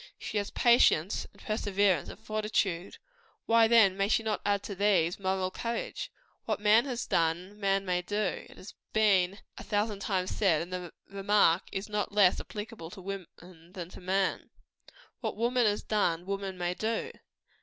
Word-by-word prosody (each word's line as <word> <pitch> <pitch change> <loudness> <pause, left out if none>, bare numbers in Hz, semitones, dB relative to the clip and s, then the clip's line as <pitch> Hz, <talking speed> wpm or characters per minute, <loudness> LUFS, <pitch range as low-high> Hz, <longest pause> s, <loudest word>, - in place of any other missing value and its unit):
She 215 - -3
has 205 - -3
patience, 215 -7 +3
and - - -21
perseverance, 200 -5 +1
and - - -9
fortitude 210 -4 -2 0.5
why 230 0 +5
then 220 -5 +5
may 195 0 +1
she 225 - +2
not 215 -2 -1
add 200 -1 +1
to 200 - -5
these, 190 -4 +2
moral 190 -1 -1
courage? 230 +4 -4 0.3
What - - -1
man 215 +4 +5
has 250 -3 -3
done, 175 +5 -1
man 195 -1 +1
may 180 -1 0
do 205 +1 -2
has 190 - -11 0.2
been 200 -3 +3 0.2
a - - -8
thousand 210 -1 -1
times 185 -2 -1
said; 170 -7 +2
and 180 +2 -9
the 180 -2 -5 0.2
remark 195 -3 +2
is 195 +1 -4
not 210 0 -2
less 200 -3 +4
applicable 210 -5 -7
to 190 +1 -11
woman 195 -1 -5
than 175 0 -11
to - - -12
man. 190 +1 0 0.7
What - - -4
woman 240 +1 +2
has 205 0 0
done, 175 -5 0
woman 195 -1 -4
may 175 0 -1
do. 230 - -2
195 Hz, 165 wpm, -30 LUFS, 180-215 Hz, 0.7 s, why